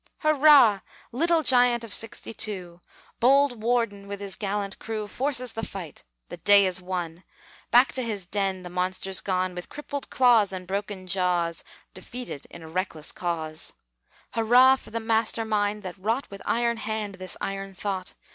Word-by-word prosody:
Hurrah! 290 -8 +6 0.3
little 325 +6 +2
giant 245 -3 +4
of 225 - -6
'62! 195 -6 -3 0.4
Bold 265 -1 +4
Worden 230 -4 0
with 200 0 -6
his 200 -2 -4
gallant 200 -1 -3
crew 220 -1 -4
Forces 255 +1 0
the 225 - -4
fight; 185 -8 -8 0.2
the - - -8
day 200 -1 +6
is 185 0 0
won; 180 -2 -4 0.5
Back 245 +1 +5
to 260 - 0
his 210 -6 -3
den 195 -1 -2
the 180 - -8
monster's 185 +1 -1
gone 185 -1 -1
With 180 0 -8
crippled 285 -1 -6
claws 235 -6 +4
and 185 -1 -6
broken 195 0 -4
jaws, 180 -2 0 0.3
Defeated 245 - -8
in 165 - -11
a - - -9
reckless 160 -2 -3
cause. 160 -3 -4 0.6
Hurrah 245 +4 +6
for - - -14
the 230 - -3
master 225 0 0
mind 210 -1 0
that 185 0 -7
wrought, 225 +7 -1
With 200 - -9
iron 235 0 +1
hand, 215 -2 -3
this 185 0 -5
iron 195 0 -5
thought! 190 -1 -4
205 Hz, 160 wpm, -26 LUFS, 185-235 Hz, 0.6 s, Hurrah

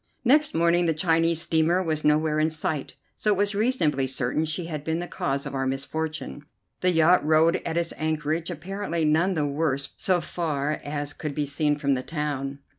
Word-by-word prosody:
Next 295 +4 +4
morning 170 +1 +3
the 160 - +1
Chinese 165 0 +2
steamer 170 +3 +2
was 155 -3 -2
nowhere 155 0 +2
in 155 +1 +2
sight, 155 -2 -3 0.2
so 215 - -1
it 200 - +2
was 205 +1 +2
reasonably 200 - +1
certain 130 +4 0
she 160 +3 -3
had 155 -3 -5
been 160 +1 -1
the 175 - -3
cause 140 -5 -3
of - - -6
our 135 -1 -1
misfortune. 150 +2 -4 0.4
The 180 - +2
yacht 165 0 +4
rode 160 +2 +4
at 165 0 -4
its 170 -1 -1
anchorage, 155 +1 -1
apparently 175 0 -3
none 170 +5 +2
the 150 -2 +1
worse 140 -1 -1
so 185 -2 +1
far 155 -3 -2
as 145 0 -3
could 150 -2 -5
be 150 - 0
seen 145 +1 0
from 140 -2 +1
the 130 - -1
town. 140 -2 -3
155 Hz, 190 wpm, -25 LUFS, 145-170 Hz, 0.4 s, Next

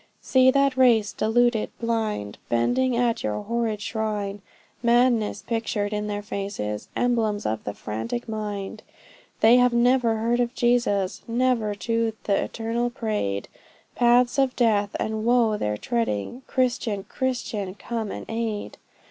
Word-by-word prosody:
See 260 0 +4
that 275 0 +3
race, 235 -5 +4
deluded, 230 0 +2
blinded, 220 - -2
Bending 245 - +1
at 240 -1 +1
yon 105 0 -3
horrid 225 -2 -1
shrine; 210 -3 -3 0.4
Madness 235 -3 +2
pictured 215 -3 -2
in 210 0 -2
their 205 0 -3
faces, 195 - -4
Emblems 225 -4 0
of 110 0 -2
the 100 - -4
frantic 115 - -4
mind; 210 -3 -4 0.6
They 230 +3 +7
have 250 -1 +4
never 240 -1 +3
heard 235 +2 +1
of 245 +1 0
Jesus, 240 -6 +1
Never 230 -3 +1
to 230 +3 -1
th' - - -11
Eternal 230 +4 0
prayed; 210 - -2 0.5
Paths 245 +2 +3
of 265 -1 +2
death 210 -4 +2
and 220 0 -2
woe 235 -2 +3
they're 105 - -2
treading, 230 - -2
Christian! 240 -5 0
Christian! 210 -5 -3
come 225 0 -4
and - - -6
aid! 225 -2 -4
225 Hz, 135 wpm, -25 LUFS, 205-240 Hz, 0.6 s, They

